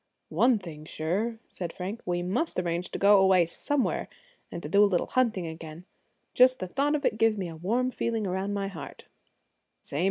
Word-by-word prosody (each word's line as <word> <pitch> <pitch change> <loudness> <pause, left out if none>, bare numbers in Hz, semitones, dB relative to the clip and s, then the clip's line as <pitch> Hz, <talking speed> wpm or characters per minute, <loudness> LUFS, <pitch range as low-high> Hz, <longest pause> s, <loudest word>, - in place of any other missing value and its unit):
"One 245 -1 +3
thing 160 -6 -9
sure," 195 +10 -2
said 175 -3 -6
Frank, 195 +7 -6
"we 175 0 0
must 200 - -1
arrange 175 0 -1
to - - -5
go 200 0 +6
away 190 -2 +5
somewhere, 265 - -1 0.4
and 170 - -5
do 200 +7 +4
a 205 - +4
little 180 -3 +1
hunting 230 -8 +1
again. 160 +1 -8 0.5
Just 255 +1 +6
the 185 - -4
thought 280 +9 +1
of 290 -2 -2
it 215 - +1
gives 225 -1 +3
me 190 -3 -3
a 165 - -8
warm 235 +10 0
feeling 230 -3 -2
around 190 +2 -2
my 200 -1 -2
heart." 170 -7 -9
195 Hz, 185 wpm, -28 LUFS, 175-230 Hz, 0.5 s, go